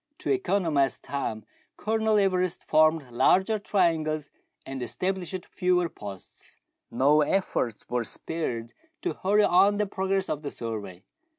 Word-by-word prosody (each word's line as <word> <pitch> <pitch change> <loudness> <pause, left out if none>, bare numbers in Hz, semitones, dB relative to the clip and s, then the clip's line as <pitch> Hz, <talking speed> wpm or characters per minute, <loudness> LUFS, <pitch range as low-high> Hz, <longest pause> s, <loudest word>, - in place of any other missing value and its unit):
To 365 - -2
economize 175 - +1
time, 110 -6 -4 0.3
Colonel 220 0 +1
Everest 185 -3 +1
formed 155 -4 +3
larger 190 - +3
triangles 160 -7 0 0.3
and 135 -1 -6
established 185 +6 -3
fewer 180 -2 +1
posts. 100 -7 -11 0.3
No 140 +6 +4
efforts 145 - -1
were 120 0 -1
spared 120 -3 -3 0.3
to 360 - -1
hurry 205 +2 +4
on 195 +3 +4
the 210 - +1
progress 195 0 -1
of 150 - -3
the 145 - -4
survey. 105 -7 -6
165 Hz, 125 wpm, -27 LUFS, 135-195 Hz, 0.3 s, No